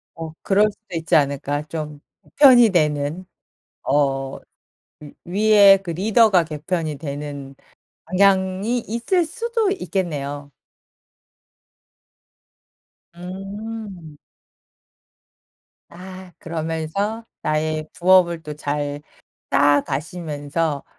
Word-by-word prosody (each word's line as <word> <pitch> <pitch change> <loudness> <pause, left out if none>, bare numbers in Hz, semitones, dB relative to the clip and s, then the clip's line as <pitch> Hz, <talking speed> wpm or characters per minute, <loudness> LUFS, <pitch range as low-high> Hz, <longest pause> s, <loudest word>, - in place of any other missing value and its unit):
'어 165 -1 -6
그럴 205 +2 +3
수도 200 -4 -12
있지 165 0 0
않을까 145 0 +1
좀 150 -1 -6 0.2
개편이 250 -6 +6
되는? 150 0 0 0.6
어 135 -1 0 0.6
위 150 -1 -12 0.4
위에 200 -2 +8
그 175 - -5
리더가 195 +1 +3
개편이 155 0 -3
되는 140 -1 -7 0.5
방향이 190 +4 +2
있을 240 - 0
수도 455 +3 -1
있겠네요. 145 - -4 2.6
음. 195 -1 -8 1.7
아. 185 +1 -11
그러면서 165 +7 -3 0.2
나의 155 0 -1
부업을 175 -2 +3
또 150 - -6
잘 145 0 -3 0.5
쌓아 145 +1 +4
가시면서 150 0 -3
165 Hz, 170 characters per minute, -21 LUFS, 150-195 Hz, 2.6 s, 위에